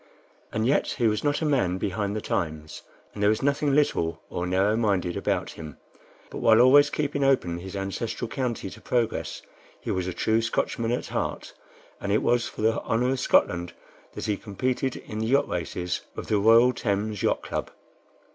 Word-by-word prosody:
And 110 +1 -1
yet 135 +4 +2
he 120 - +1
was 105 -1 0
not 145 +2 0
a - - +1
man 120 -12 +1
behind 100 +1 -2
the 110 - -2
times, 75 -4 -3 0.3
and 105 - -7
there 105 - +4
was 110 +4 0
nothing 140 0 +2
little 85 - +1
or 90 0 -2
narrow 95 +4 +2
minded 100 -6 0
about - - -1
him; 80 -3 -9 0.5
but - - -6
while 110 0 +5
always 145 +4 +7
keeping 145 -1 -1
open 90 -11 +2
his 95 +2 -8
ancestral 110 +5 -3
county 120 -6 -3
to - - -12
progress, 120 -3 -1 0.4
he - - -4
was 95 -1 -1
a - - -1
true 110 +5 +1
Scotchman 115 0 -1
at 125 - -2
heart, - - -3 0.5
and 100 - -3
it 105 - +2
was 120 -1 +2
for - - -7
the 115 +1 +2
honor 120 +3 0
of 135 - -1
Scotland 90 -7 +2 0.4
that - - -5
he 105 -2 0
competed 125 +6 -2
in 105 - -7
the 110 - -1
yacht 140 +4 +3
races 90 +1 -3 0.2
of - - -5
the 105 - +1
Royal 115 +4 +6
Thames 105 -3 -2
Yacht - - +1
Club. - - -4
110 Hz, 190 wpm, -26 LUFS, 95-125 Hz, 0.5 s, always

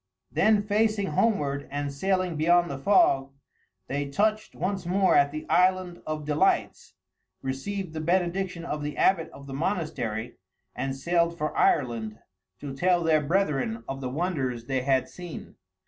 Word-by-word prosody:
Then, 215 -1 +3
facing 210 -1 +1
homeward 145 -8 0
and 145 0 -3
sailing 185 +3 0
beyond 175 +2 +3
the 135 - -5
fog, 140 - +3 0.6
they 140 +5 -3
touched 215 +8 0
once 190 +2 -2
more 185 +2 +2
at 140 0 +5
The 155 +1 -6
Island 180 +1 +2
of 155 -1 -3
Delights, 150 0 0 0.5
received 160 +7 -4
the 155 - -4
benediction 175 +1 0
of 150 -2 -3
the 145 0 -4
abbot 175 -4 +3
of 140 - -13
the 135 - -8
monastery, 130 - -2 0.4
and 135 0 -2
sailed 170 +3 +1
for 155 -1 -2
Ireland 115 -6 +1 0.4
to 140 -2 -5
tell 175 +4 +2
their 160 -2 +3
brethren 140 - 0
of 135 0 -5
the 130 - -3
wonders 135 -6 -2
they 130 0 -1
had 130 0 +1
seen. 175 -2 -9
155 Hz, 150 wpm, -27 LUFS, 140-185 Hz, 0.6 s, at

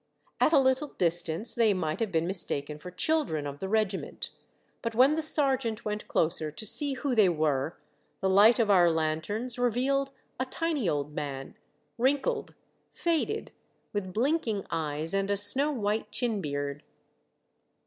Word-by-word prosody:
At - - +4
a 320 - +6
little 260 +2 +2
distance 175 +4 +1
they 225 -4 +3
might 160 -4 -2
have 225 -4 -1
been 165 -1 +1
mistaken 150 -5 -1
for 180 - -8
children 180 - 0
of 140 0 -6
the 190 - -4
regiment, 210 -3 -1 0.5
but 230 -1 -3
when 260 +5 +5
the 320 - 0
sergeant 270 -7 +1
went 210 0 -3
closer 160 -1 +1
to 155 +9 -7
see 285 +6 +2
who 270 0 -2
they 215 -5 +5
were, 155 -2 0 0.4
the 190 - 0
light 205 +5 +6
of 225 -4 +2
our 175 -3 +6
lanterns 165 +10 -1
revealed 260 +3 +1 0.3
a 260 - 0
tiny 300 - -1
old 145 0 -2
man, 135 -2 -5 0.4
wrinkled, 285 - 0 0.4
faded, 335 -2 -1 0.4
with 195 -3 -3
blinking 230 - 0
eyes 160 0 -1
and 195 0 0
a 200 - +1
snow 265 +9 +3
white 215 -5 -2
chin 230 -5 -1
beard. 145 -2 -3
205 Hz, 155 wpm, -28 LUFS, 160-260 Hz, 0.5 s, a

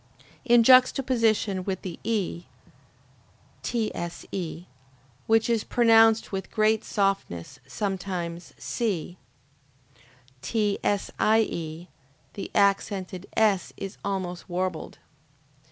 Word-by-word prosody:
In 240 -3 +5
juxtaposition 235 -6 +4
with 190 -1 -4
the 180 -3 -6
E, 195 -6 -2 1.2
(TSE,) 175 -5 -4 0.6
which 225 0 +3
is 230 -3 +1
pronounced 225 -2 +4
with 190 -1 -4
great 215 0 +2
softness, 195 - -2
sometimes 180 -4 -4
C, 185 -6 -3 1.2
(TSIE,) 200 -3 0 0.5
the 200 - -6
accented 195 -2 +1
S 210 -4 +2
is 195 -1 -6
almost 185 -3 -4
warbled. 180 -2 -3
200 Hz, 80 wpm, -26 LUFS, 180-225 Hz, 1.2 s, In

